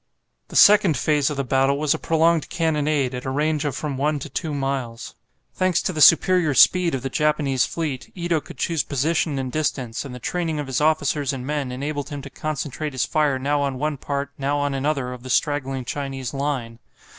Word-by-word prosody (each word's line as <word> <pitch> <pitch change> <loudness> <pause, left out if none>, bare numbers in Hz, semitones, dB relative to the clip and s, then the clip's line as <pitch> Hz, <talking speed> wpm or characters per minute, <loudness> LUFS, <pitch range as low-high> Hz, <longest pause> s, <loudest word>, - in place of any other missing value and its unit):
The - - -11
second 200 -6 +6
phase 150 -2 +2
of 150 - -4
the 140 - 0
battle 135 +2 +2
was 150 0 +2
a - - -4
prolonged 165 -1 +2
cannonade 150 -5 0
at 125 0 -5
a - - -3
range 150 +2 0
of 140 -3 -2
from 145 -3 -4
one 150 +2 0
to 145 +2 -7
two 155 +4 -3
miles. 135 -4 -3 0.4
Thanks 185 -2 +1
to 185 - -1
the 155 - -2
superior 165 -2 +5
speed 180 -1 +5
of 130 - -5
the 135 - -2
Japanese 145 -3 +1
fleet, 150 -6 -4
Ito 170 -3 -1
could - - -12
choose 165 -3 0
position 150 +1 0
and 130 -1 -3
distance, 130 -6 -2
and 135 -3 -8
the - - -8
training 165 +2 -2
of 145 - -3
his 135 0 -2
officers 150 -2 +1
and 130 -2 -5
men 145 -2 -2
enabled 145 +3 -4
him 145 -2 -6
to 140 - -9
concentrate 155 -1 -4
his 130 - 0
fire 150 -3 +1
now 145 +2 0
on 140 -2 -1
one 150 +1 -2
part, 140 +1 -3
now 140 +1 0
on 145 -1 -1
another, 135 -2 -1
of 125 - -10
the 130 - -9
straggling 135 -2 0
Chinese 135 -1 -4
line. 135 -5 -3
145 Hz, 210 wpm, -23 LUFS, 135-155 Hz, 0.4 s, second